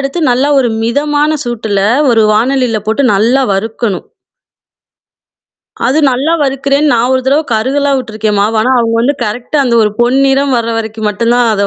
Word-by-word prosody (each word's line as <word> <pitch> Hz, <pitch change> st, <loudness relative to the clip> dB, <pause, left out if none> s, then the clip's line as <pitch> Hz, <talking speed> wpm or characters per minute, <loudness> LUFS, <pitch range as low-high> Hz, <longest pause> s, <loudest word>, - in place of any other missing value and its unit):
எடுத்து, 275 Hz, +5 st, -3 dB
நல்லா 260 Hz, +4 st, +1 dB
ஒரு 250 Hz, -3 st, +1 dB
மிதமான 295 Hz, +5 st, 0 dB
சூட்டுல 220 Hz, -4 st, -2 dB, 0.3 s
ஒரு 225 Hz, -2 st, +3 dB
வாணலில 245 Hz, 0 st, 0 dB
போட்டு 260 Hz, +5 st, 0 dB
நல்லா 240 Hz, +7 st, +2 dB
வறுக்கணும். 210 Hz, -1 st, -3 dB, 1.8 s
அது 270 Hz, +6 st, +1 dB
நல்லா 270 Hz, +6 st, -1 dB
வறுக்கிறேன்னு, 280 Hz, +2 st, 0 dB
நான் 240 Hz, +2 st, +1 dB
ஒரு 260 Hz, -, +1 dB
தரவை 290 Hz, +4 st, +2 dB
கருகலாம் 275 Hz, +5 st, 0 dB
விட்டுருக்கேன் 215 Hz, -3 st, -3 dB
மாவ. 215 Hz, +2 st, 0 dB
ஆனா, 255 Hz, -, +1 dB
அவங்க 230 Hz, -1 st, 0 dB
வந்து 270 Hz, +5 st, +1 dB
கரெக்ட்டா 240 Hz, +7 st, -3 dB
அந்த 240 Hz, -2 st, 0 dB
ஒரு 210 Hz, -, +1 dB
பொன் 245 Hz, +3 st, +2 dB
நிறம் 270 Hz, 0 st, +1 dB
வர 230 Hz, -, -3 dB
வரைக்கும் 220 Hz, -1 st, -4 dB
மட்டும் 230 Hz, +3 st, 0 dB
தான் 240 Hz, -2 st, +2 dB
அத 200 Hz, 0 st, 0 dB
245 Hz, 165 wpm, -11 LUFS, 220-275 Hz, 1.8 s, ஒரு